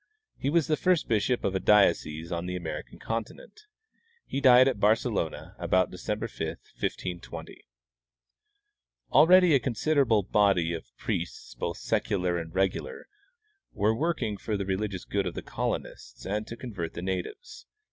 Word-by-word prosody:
He 140 Hz, -, -2 dB
was 165 Hz, 0 st, +3 dB
the 155 Hz, -, +1 dB
first 180 Hz, 0 st, +2 dB
bishop 115 Hz, +2 st, +1 dB
of 95 Hz, -, 0 dB
a 95 Hz, -, 0 dB
diocese 85 Hz, -6 st, +3 dB
on 85 Hz, 0 st, -3 dB
the 90 Hz, -, -3 dB
American 85 Hz, -3 st, -6 dB
continent. 115 Hz, -, -6 dB, 0.6 s
He 140 Hz, -, -3 dB
died 130 Hz, -1 st, +7 dB
at 130 Hz, -, 0 dB
Barcelona 105 Hz, -5 st, 0 dB
about 90 Hz, 0 st, +2 dB
December 105 Hz, +5 st, -3 dB
5, -, -, -18 dB
1520. 85 Hz, +2 st, -6 dB, 1.5 s
"Already 180 Hz, 0 st, +7 dB
a 140 Hz, -, +6 dB
considerable 125 Hz, -2 st, +2 dB
body 95 Hz, -4 st, +2 dB
of 80 Hz, -, -8 dB
priests, -, -, -4 dB
both -, -, -4 dB
secular 90 Hz, -3 st, 0 dB
and 80 Hz, -1 st, -7 dB
regu 95 Hz, +2 st, +1 dB
lar, 475 Hz, 0 st, -9 dB, 0.7 s
were 105 Hz, +2 st, +2 dB
working 130 Hz, -6 st, -1 dB
for 105 Hz, +1 st, -2 dB
the 100 Hz, -, -3 dB
religious 95 Hz, -1 st, -2 dB
good -, -, -1 dB
of -, -, -5 dB
the -, -, -5 dB
colonists -, -, -5 dB
and 105 Hz, +3 st, -2 dB
to 115 Hz, -, -7 dB
convert 100 Hz, -11 st, -6 dB
the 85 Hz, -, -5 dB
natives. 95 Hz, -, -5 dB
105 Hz, 150 wpm, -28 LUFS, 90-130 Hz, 1.5 s, died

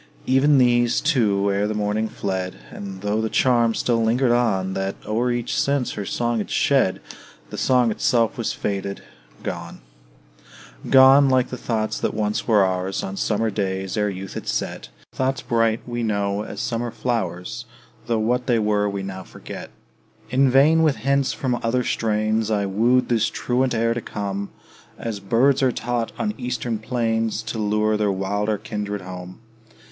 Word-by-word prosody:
Even 140 Hz, +2 st, +4 dB
these, 120 Hz, -2 st, +3 dB
too, 105 Hz, -9 st, +2 dB
ere 100 Hz, +1 st, +1 dB
the 110 Hz, -, -2 dB
morning, 105 Hz, +1 st, -1 dB
fled; 95 Hz, -3 st, -3 dB, 0.2 s
And, 95 Hz, -2 st, -8 dB
tho' 105 Hz, +2 st, 0 dB
the 110 Hz, -, -1 dB
charm 120 Hz, -3 st, +3 dB
still 115 Hz, -2 st, +1 dB
lingered 120 Hz, +3 st, +2 dB
on, 100 Hz, -6 st, +1 dB
That 95 Hz, 0 st, -2 dB
o'er 115 Hz, +4 st, 0 dB
each 120 Hz, -1 st, -1 dB
sense 140 Hz, -3 st, +1 dB
her 100 Hz, -2 st, -5 dB
song 120 Hz, -1 st, 0 dB
had 105 Hz, -, -4 dB
shed, -, -, +2 dB, 0.5 s
The -, -, -6 dB
song 125 Hz, -3 st, +3 dB
itself 120 Hz, 0 st, +1 dB
was 115 Hz, -4 st, -2 dB
faded, 100 Hz, -1 st, -4 dB, 0.4 s
gone; -, -, -6 dB, 1.1 s
Gone, 135 Hz, +1 st, +7 dB
like 130 Hz, -1 st, +2 dB
the -, -, -4 dB
thoughts 110 Hz, -3 st, -2 dB
that -, -, -1 dB
once 105 Hz, -1 st, -1 dB
were 105 Hz, -4 st, +5 dB
ours, 95 Hz, +1 st, -2 dB
On 95 Hz, -, -4 dB
summer 110 Hz, +3 st, 0 dB
days, 95 Hz, -1 st, -2 dB
ere 105 Hz, -1 st, +1 dB
youth 95 Hz, 0 st, -7 dB
had -, -, -7 dB
set; -, -, -3 dB, 0.2 s
Thoughts 130 Hz, 0 st, -1 dB
bright, 115 Hz, -1 st, +1 dB
we 120 Hz, 0 st, -3 dB
know, 100 Hz, -2 st, 0 dB
as 105 Hz, 0 st, -6 dB
summer 120 Hz, 0 st, -2 dB
flowers, 115 Hz, -2 st, -3 dB, 0.4 s
Tho' 115 Hz, -1 st, +1 dB
what 120 Hz, +3 st, 0 dB
they 120 Hz, -, +3 dB
were 105 Hz, -1 st, +1 dB
we 100 Hz, -1 st, -4 dB
now 95 Hz, -1 st, -6 dB
forget. -, -, -9 dB, 0.6 s
In 135 Hz, +1 st, +4 dB
vain 145 Hz, +5 st, +5 dB
with 155 Hz, -3 st, +3 dB
hints 140 Hz, +4 st, +1 dB
from 125 Hz, -3 st, -2 dB
other 125 Hz, +2 st, 0 dB
strains 110 Hz, -1 st, 0 dB
I 105 Hz, -2 st, +1 dB
wooed 115 Hz, +6 st, +2 dB
this 115 Hz, -3 st, +2 dB
truant 125 Hz, 0 st, 0 dB
air 115 Hz, +1 st, +2 dB
to 120 Hz, -, -4 dB
come 100 Hz, -2 st, -4 dB, 0.5 s
As 115 Hz, -3 st, -4 dB
birds 120 Hz, +8 st, +2 dB
are 130 Hz, -2 st, +3 dB
taught 120 Hz, 0 st, -2 dB
on 215 Hz, -2 st, -1 dB
eastern 125 Hz, -2 st, -2 dB
plains 115 Hz, -1 st, -1 dB
To 110 Hz, -, -4 dB
lure 105 Hz, 0 st, +1 dB
their 105 Hz, -1 st, +1 dB
wilder 100 Hz, +3 st, -1 dB
kindred 105 Hz, -2 st, -4 dB
home. 90 Hz, 0 st, -8 dB
110 Hz, 170 wpm, -22 LUFS, 100-125 Hz, 1.1 s, Gone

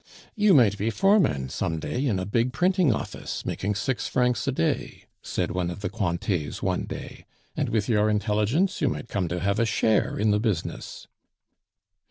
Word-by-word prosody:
"You 210 Hz, -4 st, +5 dB
might 110 Hz, -6 st, +4 dB
be 105 Hz, +3 st, 0 dB
foreman 180 Hz, -, +2 dB
some 80 Hz, +4 st, -2 dB
day 130 Hz, -, -2 dB
in 105 Hz, -6 st, +1 dB
a 95 Hz, -, -2 dB
big 115 Hz, +5 st, 0 dB
printing 180 Hz, -3 st, +3 dB
office, -, -, -4 dB
making 105 Hz, +2 st, -2 dB
six 120 Hz, +4 st, -1 dB
francs 125 Hz, 0 st, +1 dB
a -, -, +3 dB
day," 80 Hz, -11 st, -2 dB, 0.2 s
said -, -, -2 dB
one 90 Hz, 0 st, -1 dB
of 90 Hz, +3 st, -7 dB
the 95 Hz, -2 st, -3 dB
Cointets 85 Hz, -4 st, -2 dB
one -, -, 0 dB
day, -, -, -8 dB, 0.3 s
"and -, -, -1 dB
with 110 Hz, -2 st, 0 dB
your 110 Hz, -2 st, +3 dB
intelligence 105 Hz, -, +1 dB
you -, -, +3 dB
might 115 Hz, -, -5 dB
come 95 Hz, -3 st, -1 dB
to 90 Hz, +1 st, -2 dB
have 100 Hz, +3 st, +1 dB
a -, -, +4 dB
share 110 Hz, -1 st, +1 dB
in 105 Hz, +1 st, +2 dB
the 105 Hz, -, +2 dB
business." 105 Hz, -7 st, -3 dB
105 Hz, 185 wpm, -26 LUFS, 95-125 Hz, 0.3 s, You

